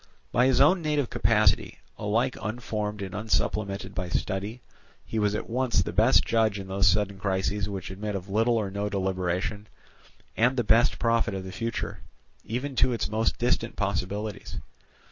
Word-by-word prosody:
By 125 +2 +4
his 130 - +3
own 170 +6 +5
native 150 -5 0
capacity, - - +2 0.2
alike 115 +5 0
unformed 105 -2 -3
and 95 - -6
unsupplemented 105 -2 -1
by 90 -1 -3
study, 100 +7 -2 0.4
he 110 - -2
was 105 0 +1
at - - -4
once 120 -5 +1
the - - -5
best - - +5
judge 110 -3 +2
in 95 -1 -7
those 95 0 +2
sudden 100 +1 +2
crises 100 +1 -1
which 95 -2 -5
admit 105 +2 -4
of 95 0 -5
little 115 +4 +2
or 105 -3 -1
of - - -12
no 100 +1 -1
deliberation, 95 +1 -2 0.7
and 125 +3 +3
the 120 - +2
best 115 +2 +4
prophet 115 -3 +1
of 95 - -4
the 95 - -7
future, 105 -2 -3 0.4
even 130 +4 -4
to 130 - +4
its 115 - -2
most 110 +1 +1
distant 120 -1 0
possibilities. 100 +1 -3
105 Hz, 170 wpm, -27 LUFS, 95-115 Hz, 0.7 s, own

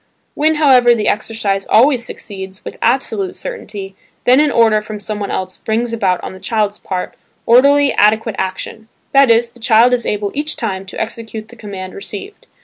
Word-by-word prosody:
When, 310 +2 +2
however, 255 -5 +5
the 215 -2 -1
exercise 210 -2 -1
always 245 +2 +4
succeeds, 190 -4 -9
with - - -8
absolute 225 -5 0
certainty, 195 -2 -7 0.3
then 255 +2 +6
an 300 0 +4
order 220 -4 +3
from 210 0 -7
someone 205 0 -4
else 185 0 -4
brings 230 +2 -2
about 190 -5 +1
on - - -6
the 185 - -11
child's 210 +1 -1
part, 185 -2 -4 0.3
orderly 280 +3 +5
adequate 220 +1 +2
action; 190 +4 -4 0.2
that 275 -2 +5
is, 230 +1 +3
the 240 - -19
child 230 +1 +4
is 240 -2 0
able 205 -1 -1
each 300 +2 -2
time 190 -1 -4
to - - -7
execute 220 -1 -6
the 240 - -13
command 195 -4 -8
received. 215 - -9
220 Hz, 175 wpm, -16 LUFS, 200-240 Hz, 0.3 s, then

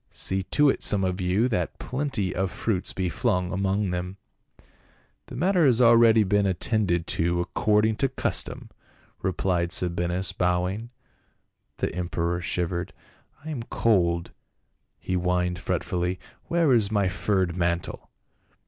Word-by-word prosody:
See 95 0 -2
to 150 +8 +3
it 135 - +1
some 100 -2 +3
of 95 0 -1
you 95 +6 +2
that 90 -8 -2
plenty 125 -9 -2
of 95 +1 -1
fruits 95 -1 -2
be 95 -1 -2
flung 90 -2 -1
among 95 +1 0
them." 90 +2 -4 0.5
" - - -35
The - - -9
matter 180 +5 +2
has 125 -5 +4
already 115 -2 +6
been 100 0 +2
attended 95 -2 0
to, 85 +1 0
accord 105 +4 +1
ing 110 0 +1
to 135 - +1
custom," 130 - -3 0.5
replied 90 -2 0
Sabinus 90 +1 0
bowing. 90 +6 -1 0.9
The - - -2
emperor 85 -1 -2
shivered. 90 0 -3 0.3
" 145 - -28
I 160 - -4
am 135 -6 -4
cold," 85 -8 +1 0.7
he - - -5
whined 90 0 0
fretfully, 90 +2 -2
" - - -34
where 170 -5 +3
is 110 -4 +2
my 100 -3 +2
furred 95 -1 0
mantle?" 85 -1 -2
95 Hz, 145 wpm, -25 LUFS, 90-110 Hz, 0.9 s, already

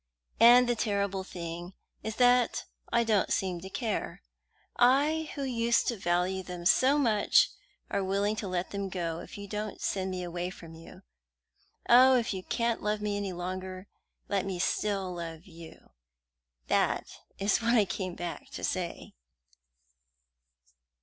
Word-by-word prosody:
And 240 +2 +8
the 240 - +2
terrible 200 -3 -1
thing 175 0 -7 0.3
is 220 -1 -4
that 245 -1 +3 0.3
I 235 0 +3
don't 215 -4 +1
seem 180 -3 -1
to 190 - -8
care; 220 - -3 0.5
I, 290 +6 +3
who 280 - -3
used 235 -2 +1
to 240 - -1
value 180 0 0
them 180 -1 -8
so 265 +9 +5
much, 225 -7 +3 0.4
am 195 -1 -1
willing 200 +2 +1
to 205 - -4
let 180 0 -2
them 200 -1 -3
go 170 -3 -3
if - - -10
you 200 0 -7
don't 210 +1 -5
send 190 -1 -1
me 185 -1 -4
away 175 0 -3
from 165 -3 -11
you. 165 0 -13 0.8
Oh, 255 +2 +7
if 235 -3 -1
you 190 - -4
can't 235 +4 -1
love 210 0 -1
me 210 -1 -2
any 200 -1 -3
longer, 185 +1 -5 0.4
let 200 -2 0
me 195 -2 -3
still 195 0 -1
love 165 -1 -7
you! 165 -3 -14 0.7
That - - +1 0.3
is 200 +4 +1
what 235 +1 +2
I 215 -3 +5
came 185 0 -4
back 175 -1 -6
to - - -7
say." 180 -2 -3
195 Hz, 155 wpm, -29 LUFS, 180-230 Hz, 0.8 s, And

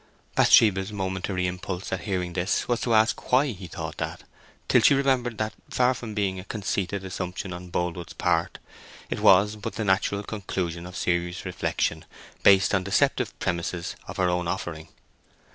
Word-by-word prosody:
Bathsheba's 100 -2 +5
momentary 95 -2 -2
impulse 90 +1 -4
at - - -2
hearing 90 -4 -2
this 90 +2 0
was 120 -1 0
to 115 -2 +2
ask 110 +1 +2
why 135 +2 +4
he 95 -4 -8
thought - - -6
that, - - -4 0.4
till - - +5
she 140 - +6
remembered 130 -4 +1
that, 110 0 -2 0.2
far 125 0 +3
from 115 -4 -7
being 95 -3 0
a - - -7
conceited 100 -2 -3
assumption 90 0 -4
on 90 0 -8
Boldwood's 85 -1 -3
part, - - 0 0.5
it - - -1
was 100 +3 +5
but 105 -2 -6
the 110 0 -2
natural 100 +1 +1
conclusion 90 -5 -4
of 90 - -8
serious 85 +1 -1
reflection 90 - -1 0.4
based 95 -1 +5
on 95 -2 +2
deceptive 100 0 +1
premises 85 0 -2
of - - -7
her 95 - +2
own 90 -1 0
offering. 85 -3 -4
95 Hz, 165 wpm, -26 LUFS, 90-105 Hz, 0.5 s, she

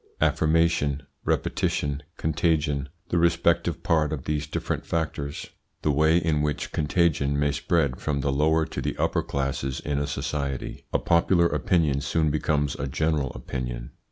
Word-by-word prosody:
Affirmation, 80 -3 +2 0.2
repetition, 70 0 0 0.2
contagion 75 -3 0 0.2
The 85 - +2
respective 85 0 +2
part 80 -4 +2
of 75 -4 -3
these 75 -1 -2
different - - -3
factors 75 -3 -3 0.3
The 75 - +3
way 80 +3 +4
in 80 -3 +1
which 75 -1 -2
contagion 75 -2 +1
may 75 0 +2
spread 70 -2 +1
from 70 -2 -1
the 70 +1 0
lower 80 +3 +2
to - - -5
the - - -3
upper - - +1
classes 70 -1 -2
in 75 -1 -2
a 70 - -1
society 70 -3 -3
A - - +3
popular 85 +1 +3
opinion 75 -1 +1
soon 75 +2 +1
becomes 75 -1 0
a 70 - -2
general 75 -1 0
opinion. - - -5
75 Hz, 150 wpm, -26 LUFS, 70-80 Hz, 0.3 s, way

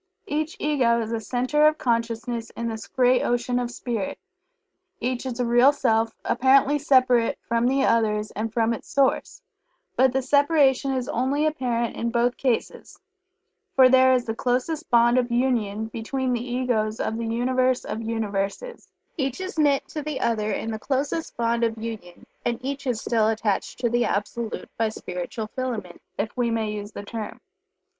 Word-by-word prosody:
Each 310 +2 -2
Ego 255 -6 +2
is 225 -1 -3
a 230 - -1
Centre 255 +7 +2
of 305 0 +2
Consciousness 230 -1 -1
in 235 - -2
this 220 -1 -6
great 250 0 +3
ocean 245 +1 0
of 245 -1 -2
Spirit 235 -4 -4 0.8
each 255 +1 -2
is 250 -1 -5
a 245 - +1
Real 240 +4 +5
Self, 225 -5 +1
apparently 270 +3 +4
separate 255 -4 +3
from 235 +1 +1
the 270 +1 +2
others 215 -2 +1
and 220 +2 -3
from 230 0 +1
its 230 - -8
source, 280 - +1 0.5
but 260 0 +4
the 265 +1 0
separation 280 -1 +3
is 255 -2 -2
only 270 +5 0
apparent 245 -6 -1
in 235 - -2
both 240 +1 +1
cases, 250 -4 -2 0.8
for 260 -1 +7
there 260 0 +6
is 250 -1 +1
the 225 - -2
closest 255 +8 -1
bond 240 +1 +5
of 245 -1 -2
union 230 -4 0
between 250 +4 -2
the 240 +1 -3
Egos 230 -4 0
of 220 - -2
the 230 - -3
Universe 255 +2 +1
of 225 - -4
Universes 225 - -3 0.3
each 270 -1 -2
is 375 -3 -5
knit 285 -2 +3
to 305 - -4
the 295 -2 -4
other 215 -3 0
in 225 +2 -3
the 220 - -4
closest 285 +6 -2
bond 235 0 +1
of 225 -1 0
union, 220 -6 -7 0.2
and 240 -1 0
each 280 0 -4
is 240 -3 0
still 220 -2 +1
attached 215 -2 -1
to 240 - 0
the 240 +1 +1
Absolute 215 +2 -3
by 225 -1 +2
spiritual 180 +1 -5
filaments, 225 -6 -5
if 215 +1 -3
we 245 -2 +1
may 225 -2 -1
use 205 0 -6
the 205 - -7
term. 215 +1 -6
240 Hz, 175 wpm, -24 LUFS, 225-260 Hz, 0.8 s, for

